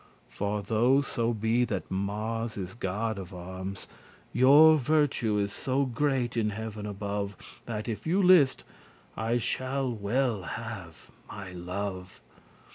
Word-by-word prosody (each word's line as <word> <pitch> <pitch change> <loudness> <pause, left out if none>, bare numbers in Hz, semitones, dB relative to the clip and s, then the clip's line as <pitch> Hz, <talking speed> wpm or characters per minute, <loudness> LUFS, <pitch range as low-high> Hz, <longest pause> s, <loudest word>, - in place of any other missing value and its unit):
For 105 0 -2
though 120 +6 +3
so 120 -4 -1
be 115 +2 +1
that - - -4
Mars 110 +4 -2
is 95 -2 -5
god 110 0 -2
of 95 0 -8
arms, 95 +2 -6 0.5
Your 145 +6 +8
virtue 135 -6 +2
is 100 -1 -1
so 135 +1 0
great 130 -1 0
in 110 -2 +1
heaven 105 0 -5
above, 100 -1 -3 0.3
That, 110 -1 -4
if 115 +5 -4
you 180 +5 +2
list, 175 -8 +5 0.5
I 115 +2 0
shall 130 +2 -1
well 115 +1 0
have 100 -3 -7 0.2
my 100 -3 -7
love. 90 +1 -5
110 Hz, 130 wpm, -29 LUFS, 100-125 Hz, 0.5 s, Your